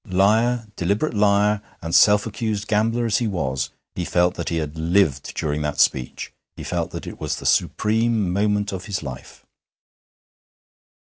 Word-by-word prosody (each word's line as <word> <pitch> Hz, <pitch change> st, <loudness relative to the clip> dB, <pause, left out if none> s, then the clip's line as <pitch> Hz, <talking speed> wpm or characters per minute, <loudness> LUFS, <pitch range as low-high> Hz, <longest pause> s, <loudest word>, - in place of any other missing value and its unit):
Liar, 110 Hz, +6 st, +2 dB
deliberate 100 Hz, -, 0 dB
liar 105 Hz, 0 st, +3 dB, 0.2 s
and 85 Hz, 0 st, -6 dB
self 105 Hz, -1 st, +6 dB
accused 110 Hz, -1 st, -3 dB
gambler 115 Hz, +3 st, +1 dB
as 115 Hz, -, +1 dB
he 120 Hz, -, 0 dB
was, 65 Hz, -9 st, -2 dB, 0.2 s
he 90 Hz, -, -3 dB
felt 90 Hz, +1 st, +2 dB
that -, -, -4 dB
he 85 Hz, -, -2 dB
had 75 Hz, -1 st, -3 dB
lived 80 Hz, -3 st, +1 dB
during 75 Hz, 0 st, -2 dB
that 75 Hz, -1 st, -3 dB
speech; 65 Hz, -2 st, 0 dB, 0.2 s
he -, -, -8 dB
felt -, -, -2 dB
that -, -, -7 dB
it -, -, -8 dB
was -, -, -1 dB
the -, -, -9 dB
supreme 110 Hz, -3 st, +1 dB
moment 105 Hz, +1 st, +1 dB
of 95 Hz, 0 st, -5 dB
his 100 Hz, -6 st, -3 dB
life. 65 Hz, -2 st, -9 dB
100 Hz, 165 wpm, -22 LUFS, 85-110 Hz, 0.2 s, self